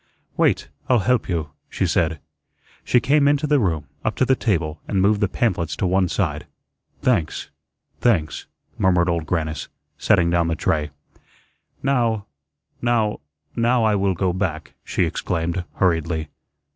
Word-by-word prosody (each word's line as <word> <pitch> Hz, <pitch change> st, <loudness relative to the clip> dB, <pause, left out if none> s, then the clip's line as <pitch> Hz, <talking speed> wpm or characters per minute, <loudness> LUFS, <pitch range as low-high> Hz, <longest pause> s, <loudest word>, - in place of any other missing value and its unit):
"Wait, -, -, +2 dB, 0.2 s
I'll 125 Hz, -, +5 dB
help 125 Hz, -4 st, +2 dB
you," 80 Hz, -5 st, -2 dB, 0.2 s
she -, -, -1 dB
said. 80 Hz, -3 st, +1 dB, 0.6 s
She 125 Hz, -, +3 dB
came 140 Hz, +3 st, +3 dB
into 145 Hz, +1 st, +2 dB
the 150 Hz, -1 st, +3 dB
room, 80 Hz, -, 0 dB, 0.2 s
up 110 Hz, -, -1 dB
to 130 Hz, -, +2 dB
the 130 Hz, -, +3 dB
table, 85 Hz, -10 st, -1 dB
and 100 Hz, -, 0 dB
moved 100 Hz, +2 st, +3 dB
the 105 Hz, -, +3 dB
pamphlets 95 Hz, -6 st, -1 dB
to -, -, -1 dB
one 95 Hz, 0 st, +2 dB
side. -, -, -1 dB, 0.6 s
"Thanks, 105 Hz, -11 st, 0 dB, 0.5 s
thanks," 90 Hz, -11 st, +1 dB, 0.3 s
murmured 90 Hz, -2 st, +3 dB
Old 85 Hz, -2 st, -1 dB
Grannis, 80 Hz, -3 st, -2 dB, 0.3 s
setting 85 Hz, -1 st, +3 dB
down 85 Hz, -1 st, +2 dB
the 80 Hz, -, 0 dB
tray. 75 Hz, 0 st, 0 dB, 0.9 s
"Now 120 Hz, -6 st, +1 dB, 0.6 s
now 115 Hz, -3 st, +1 dB, 0.4 s
now 120 Hz, +1 st, +2 dB
I 110 Hz, -1 st, +3 dB
will 100 Hz, -2 st, +1 dB
go 90 Hz, +1 st, 0 dB
back," 90 Hz, -4 st, -3 dB
she -, -, 0 dB
exclaimed, 85 Hz, +1 st, -2 dB
hurriedly. 80 Hz, -4 st, 0 dB
95 Hz, 145 wpm, -22 LUFS, 80-115 Hz, 0.9 s, I'll